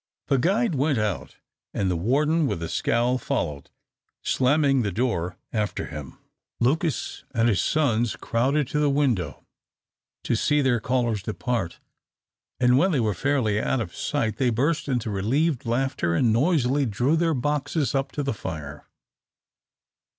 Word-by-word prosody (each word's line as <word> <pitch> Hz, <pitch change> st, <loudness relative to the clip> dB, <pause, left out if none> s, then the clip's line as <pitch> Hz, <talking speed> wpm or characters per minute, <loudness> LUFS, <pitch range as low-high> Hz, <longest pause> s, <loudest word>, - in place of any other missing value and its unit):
The 135 Hz, -, +3 dB
guide 200 Hz, -, +2 dB
went 140 Hz, 0 st, +1 dB
out, 105 Hz, -10 st, -2 dB, 0.4 s
and 95 Hz, -2 st, +1 dB
the -, -, 0 dB
warden 145 Hz, -, +2 dB
with 85 Hz, -, -3 dB
a 80 Hz, -, -4 dB
scowl 120 Hz, +2 st, +1 dB
followed, 75 Hz, -, -3 dB, 0.5 s
slamming 135 Hz, 0 st, +3 dB
the 105 Hz, -3 st, -1 dB
door 90 Hz, -5 st, -1 dB, 0.2 s
after 105 Hz, -2 st, -1 dB
him. 75 Hz, -2 st, -8 dB, 0.4 s
Lucas 155 Hz, +6 st, 0 dB
and 115 Hz, 0 st, +3 dB
his 100 Hz, -7 st, +2 dB
sons 120 Hz, -7 st, +1 dB
crowded 135 Hz, +5 st, 0 dB
to 150 Hz, -, 0 dB
the 150 Hz, -1 st, +3 dB
window 120 Hz, -, 0 dB, 0.8 s
to -, -, 0 dB
see 150 Hz, +6 st, +2 dB
their 130 Hz, -3 st, +2 dB
callers 120 Hz, -3 st, 0 dB
depart, 110 Hz, -2 st, -3 dB, 0.8 s
and 125 Hz, +1 st, +4 dB
when 190 Hz, +4 st, +3 dB
they 140 Hz, -, +2 dB
were 110 Hz, -3 st, +1 dB
fairly 110 Hz, -, +1 dB
out 135 Hz, -, 0 dB
of 100 Hz, -7 st, -5 dB
sight, 120 Hz, -7 st, -1 dB
they 130 Hz, -2 st, +2 dB
burst 145 Hz, +7 st, 0 dB
into 120 Hz, -5 st, -1 dB
relieved 125 Hz, -, 0 dB
laughter, 120 Hz, -8 st, 0 dB
and 115 Hz, +4 st, +3 dB
noisily 140 Hz, 0 st, +2 dB
drew 120 Hz, +8 st, +1 dB
their 165 Hz, -1 st, +1 dB
boxes 145 Hz, +2 st, -1 dB
up 135 Hz, -1 st, -1 dB
to 145 Hz, -, -2 dB
the 135 Hz, -, -1 dB
fire. 75 Hz, -7 st, -7 dB
125 Hz, 150 wpm, -25 LUFS, 110-145 Hz, 0.8 s, and